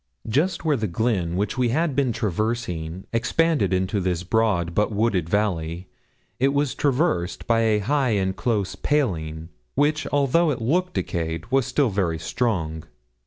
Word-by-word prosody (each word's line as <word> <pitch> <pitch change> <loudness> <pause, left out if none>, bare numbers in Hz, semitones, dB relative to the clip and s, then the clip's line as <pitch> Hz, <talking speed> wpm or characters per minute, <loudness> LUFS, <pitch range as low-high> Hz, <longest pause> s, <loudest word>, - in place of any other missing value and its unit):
Just 155 - 0
where 155 -2 +3
the 110 -2 -1
glen 90 -3 0
which 105 +6 -1
we 125 -2 +2
had 155 +3 0
been 135 -3 +2
traversing 95 -5 -2
expanded 120 - +1
into 95 +3 0
this 90 -2 -1
broad, 95 -4 +1
but 105 +4 +1
wooded 100 -6 0
valley, 90 -3 -1 0.5
it 135 +2 +2
was 145 -2 +1
traversed 135 - 0
by 115 -1 +3
a 110 -2 +3
high 140 +3 +1
and 95 -1 0
close 105 -6 -1
paling, 80 - -1 0.3
which, 150 +2 +1
although 145 +4 +3
it 135 - -1
looked 180 +10 0
decayed, 80 -1 -2
was 135 -2 +2
still 140 -6 +1
very 90 -5 0
strong. 80 -3 -2
110 Hz, 155 wpm, -24 LUFS, 90-135 Hz, 0.5 s, where